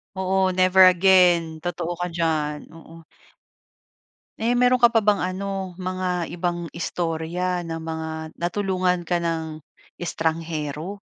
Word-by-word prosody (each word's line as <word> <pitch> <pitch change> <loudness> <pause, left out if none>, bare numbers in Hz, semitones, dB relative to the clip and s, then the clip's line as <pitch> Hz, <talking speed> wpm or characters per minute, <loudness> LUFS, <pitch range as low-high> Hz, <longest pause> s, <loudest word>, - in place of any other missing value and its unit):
Oo, 190 0 +1
never 185 +1 +5
again. 175 -3 +3
Totoo 175 -1 -3
ka 175 +1 -4
diyan, 155 -3 -1
oo. 165 0 -14 1.4
Eh, 235 +2 +1
meron 250 +1 +4
ka 240 - +8
pa 230 -2 +1
bang 205 -1 +3
ano, 190 0 -3
mga 185 -1 -2
ibang 175 -1 -3
istorya 175 +1 -2
ng 165 0 -4
mga 160 0 -4 0.3
natulungan 180 0 0
ka 175 0 0
ng 160 -2 -3 0.4
estranghero? 165 +1 -3
175 Hz, 120 wpm, -23 LUFS, 165-185 Hz, 1.4 s, ka